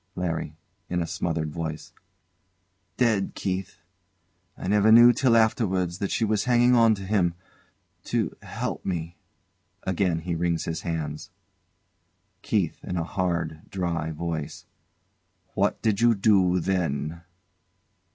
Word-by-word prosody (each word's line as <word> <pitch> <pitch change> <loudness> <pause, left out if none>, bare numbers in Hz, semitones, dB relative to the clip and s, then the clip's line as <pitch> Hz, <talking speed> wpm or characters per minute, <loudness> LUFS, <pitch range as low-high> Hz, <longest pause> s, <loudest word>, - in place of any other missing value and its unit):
LARRY. 80 -3 -3 0.3
[In 90 - -1
a 85 - 0
smothered 80 -2 -2
voice] 80 -1 -5 1.0
Dead, 110 -6 +1
Keith. 95 0 -3 0.8
I - - -6
never 105 +2 +4
knew 120 +2 +9
till 120 -3 +3
afterwards 95 -6 +1
that 100 - -2
she 115 - 0
was 105 -1 0
hanging 120 0 +4
on 115 -2 +5
to 100 - -8
him 95 -4 +1 0.7
to - - -1
h - - -13
help - - -4
me. 85 -2 -4 0.6
[Again 90 -3 0
he 85 +1 -3
wrings 85 0 -1
his 80 -1 -3
hands.] 80 -3 -4 1.1
KEITH. 95 -7 -1
[In 90 - -4
a 85 - 0
hard, 85 -3 -3
dry 85 -4 -2
voice] 80 -1 -5 0.9
What 100 +1 +1
did 110 -2 +1
you 120 -1 +5
do 95 -3 +3
then? 85 -3 -2
90 Hz, 130 wpm, -26 LUFS, 85-105 Hz, 1.1 s, knew